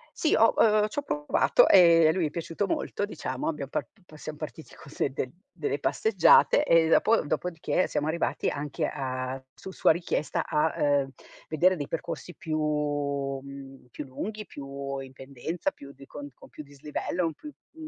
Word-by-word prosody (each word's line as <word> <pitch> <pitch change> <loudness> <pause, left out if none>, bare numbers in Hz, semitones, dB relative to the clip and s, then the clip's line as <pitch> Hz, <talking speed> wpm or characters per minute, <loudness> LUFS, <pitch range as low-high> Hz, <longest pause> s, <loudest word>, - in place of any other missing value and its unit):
Sì, 310 - +2
ho 225 - +5
uhm, 215 -1 +4
c'ho 250 +7 -3
provato, 150 - +3
e 170 -3 +7
a - - +5
lui 175 0 0
è - - -1
piaciuto 170 +5 -3
molto, 200 - -2
diciamo. 150 -9 -5
Abbiam 150 -4 -3
par - - -2
p 220 - -30
pa 155 - -15
siam 150 0 -7
partiti 155 +1 -9
col 140 - -14
de - - 0
del 130 -1 -3 0.2
delle 425 0 -2
passeggiate, 445 -6 +4
e 165 - +5
dopo 220 +7 +4
dopodiché, 165 +3 -1
siamo 150 - -2
arrivati 165 +2 -1
anche 145 0 -3
a 130 0 -4
su 190 - -10
sua - - +3
richiesta 165 -2 -1
a, 150 +1 +1
uhm, 140 -2 +1 0.4
vedere 180 +4 +3
dei 145 -3 -4
percorsi 165 +1 -5
più 155 -2 -3
mhmm, 140 -3 -3
più 150 - -7
lunghi, 210 +11 -6
più 140 -3 -6
in 135 -1 -9
pendenza, 140 - -4
più 140 - -13
di 135 0 -14
cont 145 0 -9
con - - -17
più 150 - -10
dislivello, 150 +5 -4
un 160 - -4
plu 300 - -10 0.2
mhmm, 320 -1 -10
150 Hz, 180 wpm, -27 LUFS, 140-180 Hz, 0.4 s, e